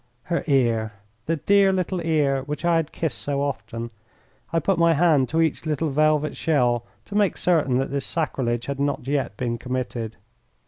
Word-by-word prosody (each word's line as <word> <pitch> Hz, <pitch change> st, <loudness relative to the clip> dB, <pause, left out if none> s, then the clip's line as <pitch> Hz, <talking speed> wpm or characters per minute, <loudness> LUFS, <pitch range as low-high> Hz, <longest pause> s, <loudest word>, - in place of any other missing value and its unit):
Her 170 Hz, -1 st, -1 dB
ear! 115 Hz, -6 st, +2 dB, 0.3 s
The 165 Hz, -, +1 dB
dear 200 Hz, +5 st, +4 dB
little 185 Hz, -1 st, -1 dB
ear 150 Hz, -5 st, +1 dB
which 145 Hz, +4 st, -5 dB
I 170 Hz, -1 st, +4 dB
had 160 Hz, -1 st, -1 dB
kissed 160 Hz, -3 st, -3 dB
so 140 Hz, -1 st, -1 dB
often. 120 Hz, -4 st, -4 dB, 0.6 s
I 165 Hz, -, +1 dB
put 170 Hz, +3 st, +1 dB
my 170 Hz, -1 st, +4 dB
hand 150 Hz, -5 st, +3 dB
to 165 Hz, +1 st, +1 dB
each 160 Hz, 0 st, -2 dB
little 155 Hz, 0 st, 0 dB
velvet 150 Hz, +1 st, +2 dB
shell 120 Hz, -7 st, +1 dB, 0.2 s
to -, -, -10 dB
make 205 Hz, -3 st, +2 dB
certain 155 Hz, -8 st, +2 dB
that 135 Hz, +1 st, -1 dB
this 140 Hz, -1 st, -1 dB
sacrilege 125 Hz, -8 st, -1 dB
had 140 Hz, 0 st, -4 dB
not 140 Hz, -2 st, -1 dB
yet 135 Hz, -7 st, -1 dB
been 120 Hz, -2 st, -2 dB
committed. 120 Hz, -3 st, -4 dB
145 Hz, 180 wpm, -24 LUFS, 130-165 Hz, 0.6 s, dear